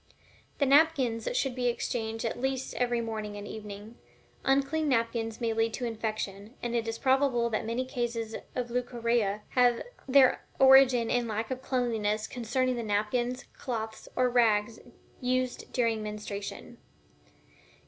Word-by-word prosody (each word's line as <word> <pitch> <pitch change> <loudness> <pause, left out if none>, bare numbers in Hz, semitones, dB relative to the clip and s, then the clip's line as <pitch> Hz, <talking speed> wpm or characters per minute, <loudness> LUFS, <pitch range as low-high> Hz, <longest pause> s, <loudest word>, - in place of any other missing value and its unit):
The 280 - +2
napkins 275 -5 +3
should 270 - 0
be 245 -1 +1
changed 225 -1 -3
at 230 +1 -3
least 265 0 -2
every 240 -1 0
morning 215 -2 -4
and 205 0 -7
evening. 210 +1 -9 0.4
Unclean 280 +3 +2
napkins 230 -2 0
may 230 -2 0
lead 225 0 0
to 250 - -3
infection, 215 -1 -4
and 240 0 -3
it 230 -1 0
is 225 0 -2
probable 260 -3 +2
that 220 0 -1
many 240 +3 -1
cases 235 -4 -3 0.2
of 245 -1 -3
leucorrhea 235 -4 0
have 245 -2 +3 0.2
their 265 -1 +5
origin 265 -3 +6
in 245 -1 +1
lack 220 +2 -3
of 260 0 -3
cleanliness 220 -5 0
concerning 250 +1 -1
the - - -2
napkins, 235 +4 -1
cloths, 220 -3 -5
or 255 - +3
rags, 230 -2 +2 0.4
used 255 0 -1
during 230 -3 +1
menstruation. 210 +2 -6
235 Hz, 140 wpm, -29 LUFS, 220-255 Hz, 0.4 s, origin